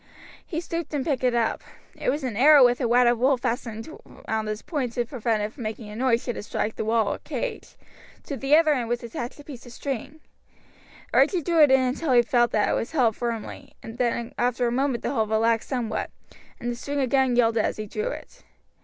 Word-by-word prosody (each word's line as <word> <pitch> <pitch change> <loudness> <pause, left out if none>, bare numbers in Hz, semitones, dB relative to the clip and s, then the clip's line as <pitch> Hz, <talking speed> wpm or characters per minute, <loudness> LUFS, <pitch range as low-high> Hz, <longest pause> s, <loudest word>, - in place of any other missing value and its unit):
He 325 - -4
stooped 335 -3 -4
and 275 - -1
picked 275 -5 -1
it 250 -1 +2
up, 230 -1 0 0.3
it - - -2
was 285 +2 -1
an 250 -5 -3
arrow 280 +3 +7
with 245 +2 +2
a 245 - +1
wad 245 +1 +4
of 240 -1 +3
wool 265 +2 +3
fastened 230 -2 -3 0.4
round 220 -1 -1
its 215 0 -4
point 265 -8 -3
to 240 0 -1
prevent 230 -4 -1
it 210 +2 -4
from 290 - -11
making 215 -1 -5
a 210 - -8
noise 240 0 +1
should 245 - -4
it - - -4
strike 210 +1 -3
the - - -3
wall 220 -2 +1
or - - -7
cage; - - -5 0.5
to 280 - -5
the 275 +3 +3
other 310 -1 +5
end 240 -4 -2
was 240 0 -2
attached 235 +3 -6
a - - -10
piece 275 -5 -10
of 240 - -11
string. 275 +4 -5 0.9
Archie 360 -5 +3
drew 335 +1 +3
it 295 - +7
in 265 0 +6
until 260 +3 0
he 240 -1 +6
felt 240 -1 +2
that 210 - +1
it - - +1
was 235 - -2
held 240 -8 +2
firmly, 235 -3 -5
then 235 0 -2
after 245 0 +1
a 235 - +1
moment 260 -1 0
the - - -1
hold 220 -5 0
relaxed 225 +1 +1
somewhat, 245 -5 -2 0.5
and 240 - -3
the - - -4
string 285 +4 -4
again 265 -1 +2
yielded 230 -2 +3
as - - -1
he 215 - -4
drew 430 - -3
it. - - -8
245 Hz, 230 wpm, -25 LUFS, 230-275 Hz, 0.9 s, arrow